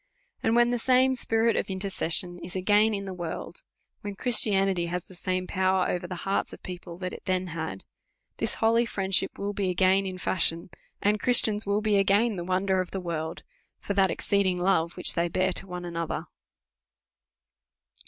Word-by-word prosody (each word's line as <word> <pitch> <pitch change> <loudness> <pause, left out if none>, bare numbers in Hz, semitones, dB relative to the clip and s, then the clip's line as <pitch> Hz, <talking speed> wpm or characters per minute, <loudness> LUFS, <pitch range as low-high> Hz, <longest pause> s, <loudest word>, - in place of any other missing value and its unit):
And 225 - +2
when 240 0 +4
the 245 - 0
same 260 +2 +4
spirit 230 -2 +1
of - - -1
intercession 185 -2 -1
is 175 +2 -8
again 210 +3 +3
in 200 0 -4
the 190 - -5
world, 175 - -6 0.4
when 205 -1 -6
Christianity 195 -6 +2
has 180 0 -3
the - - -15
same 185 +1 -2
power 185 0 +1
over 175 0 -2
the 180 - -5
hearts 195 +1 0
of - - -9
the - - -46
people, 175 -1 -8
that 180 0 -4
it - - -10
then 185 0 0
had, 160 -13 -5 0.5
this - - -1
holy 230 +1 +2
friendship 195 -3 0
will 200 +1 -3
be 200 -2 -1
again 190 +2 +3
in 185 -1 -5
fashion, 170 -1 -1 0.3
and 210 +1 +2
Christians 220 -4 +3
will 200 +1 +1
be 210 -1 +2
again 200 +3 +3
the 175 - -4
wonder 185 +1 +1
of 185 - -5
the 195 - -4
world, 165 -3 -4 0.4
for 200 - -3
that 195 -1 +3
exceeding*. 190 0 +1
love 175 -2 +1
which 180 - +2
they 170 0 +1
bear 185 +2 0
to 195 - -3
one 180 -1 -6
another. 170 -1 -3
190 Hz, 185 wpm, -27 LUFS, 180-205 Hz, 0.5 s, when